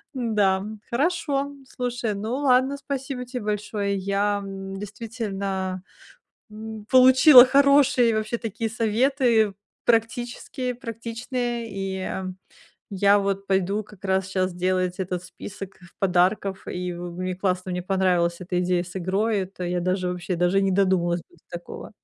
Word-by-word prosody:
Да, 210 Hz, -6 st, +1 dB, 0.3 s
хорошо, 285 Hz, 0 st, 0 dB, 0.2 s
слушай, 245 Hz, -4 st, -3 dB
ну 215 Hz, +4 st, -3 dB
ладно, 270 Hz, 0 st, +3 dB
спасибо 270 Hz, -2 st, -5 dB
те 250 Hz, +1 st, -5 dB
большое. 210 Hz, -1 st, -2 dB
Я, 200 Hz, +1 st, 0 dB
м, 195 Hz, 0 st, -7 dB
действительно, 200 Hz, -3 st, -4 dB, 0.7 s
м, 215 Hz, 0 st, -8 dB
получила 260 Hz, +1 st, +9 dB
хорошие 275 Hz, -3 st, +4 dB
вообще 215 Hz, +2 st, -2 dB
такие 225 Hz, 0 st, -3 dB
советы, 230 Hz, -1 st, +2 dB, 0.3 s
практические, 240 Hz, +2 st, -1 dB
практичные, 235 Hz, 0 st, -4 dB
и 195 Hz, -1 st, -4 dB, 0.8 s
я 200 Hz, +1 st, +4 dB
вот 195 Hz, 0 st, -2 dB
пойду 195 Hz, +2 st, 0 dB
как 210 Hz, -2 st, -17 dB
раз 190 Hz, 0 st, 0 dB
щас 185 Hz, -1 st, 0 dB
делать 185 Hz, +1 st, -1 dB
этот 180 Hz, -2 st, -3 dB
список 190 Hz, +1 st, -9 dB, 0.2 s
подарков, 190 Hz, +1 st, +1 dB
и 180 Hz, 0 st, -4 dB
мне 175 Hz, +1 st, -5 dB
в -, -, -28 dB
классно, 185 Hz, -1 st, -1 dB
мне 180 Hz, 0 st, -2 dB
понравилась 180 Hz, -2 st, +1 dB
эта 180 Hz, 0 st, -2 dB
идея 180 Hz, -1 st, +1 dB
с 180 Hz, +1 st, -10 dB
игрой, 200 Hz, +4 st, 0 dB
это 185 Hz, 0 st, -8 dB
я 175 Hz, 0 st, -1 dB
даже, 185 Hz, +1 st, 0 dB
вообще, 180 Hz, +1 st, -3 dB
даже 180 Hz, +3 st, +2 dB
и -, -, +2 dB
не 195 Hz, -, +1 dB
додумалась 180 Hz, -3 st, +2 dB
бы 175 Hz, -, -22 dB
до 160 Hz, -, -29 dB
такого. 175 Hz, -, -10 dB
200 Hz, 140 wpm, -24 LUFS, 185-235 Hz, 0.8 s, получила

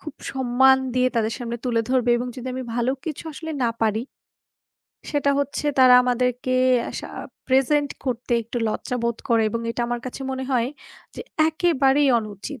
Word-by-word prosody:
খুব 305 Hz, -2 st, -8 dB, 0.2 s
সম্মান 265 Hz, 0 st, +4 dB, 0.2 s
দিয়ে 255 Hz, 0 st, +3 dB
তাদের 225 Hz, 0 st, +1 dB
সামনে 235 Hz, -1 st, -4 dB
তুলে 235 Hz, -2 st, +1 dB
ধরবে। 250 Hz, -2 st, +2 dB
এবং 245 Hz, +1 st, -3 dB
যদি 255 Hz, +1 st, -6 dB
আমি 260 Hz, -, -4 dB
ভালো 240 Hz, +1 st, +1 dB
কিছু 320 Hz, 0 st, -5 dB
আসলে 320 Hz, +2 st, -7 dB
না 235 Hz, -, +3 dB
পারি, 220 Hz, 0 st, +1 dB, 1.1 s
সেটা 285 Hz, -1 st, +1 dB
হচ্ছে 285 Hz, +1 st, -3 dB
তারা 255 Hz, -1 st, +8 dB
আমাদেরকে 250 Hz, 0 st, 0 dB, 0.4 s
আসা -, -, -6 dB, 0.4 s
প্রেজেন্ট 275 Hz, +2 st, +2 dB
করতে 245 Hz, -1 st, -3 dB
একটু 235 Hz, +2 st, -8 dB
লজ্জা 250 Hz, +3 st, -3 dB
বোধ 235 Hz, -1 st, 0 dB
করে 230 Hz, -1 st, +3 dB
এবং 230 Hz, +2 st, -2 dB
এটা 235 Hz, -, -4 dB
আমার 240 Hz, 0 st, -2 dB
কাছে 255 Hz, -, -7 dB
মনে 265 Hz, 0 st, -3 dB
হয় 240 Hz, -1 st, +2 dB, 0.5 s
যে -, -, -7 dB, 0.3 s
একেবারেই 290 Hz, -4 st, +2 dB
অনুচিত। 215 Hz, +5 st, -7 dB
250 Hz, 165 wpm, -23 LUFS, 235-270 Hz, 1.1 s, তারা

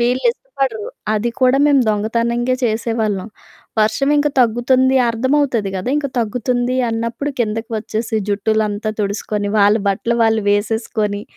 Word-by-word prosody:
వీళ్ళు 245 Hz, +2 st, +1 dB
ఇష్టపడరు. 270 Hz, -, -4 dB, 0.3 s
అది 220 Hz, +3 st, 0 dB
కూడా 255 Hz, +1 st, +4 dB
మేము 285 Hz, -2 st, +4 dB
దొంగతనంగా 235 Hz, +4 st, 0 dB
చేసేవాళ్ళం. 220 Hz, -3 st, -1 dB, 0.5 s
వర్షమింక 280 Hz, +7 st, +2 dB
తగ్గుతుంది, 255 Hz, +3 st, +3 dB
అర్థమవుతది 245 Hz, -2 st, +1 dB
గదా! 190 Hz, +7 st, -3 dB
ఇంక 295 Hz, -1 st, -1 dB
తగ్గుతుంది 245 Hz, +2 st, -1 dB
అన్నప్పుడు 230 Hz, +5 st, -3 dB
కిందకి 225 Hz, 0 st, -2 dB
వచ్చేసి, 220 Hz, +1 st, -3 dB
జుట్టులంతా 215 Hz, +1 st, 0 dB
తుడుసుకొని, 205 Hz, 0 st, -2 dB
వాళ్ళ 205 Hz, +1 st, +5 dB
బట్టలు 230 Hz, +4 st, 0 dB
వాళ్ళు 225 Hz, -1 st, +2 dB
వేసేసుకోని, 210 Hz, 0 st, -1 dB
225 Hz, 115 wpm, -18 LUFS, 215-255 Hz, 0.5 s, వాళ్ళ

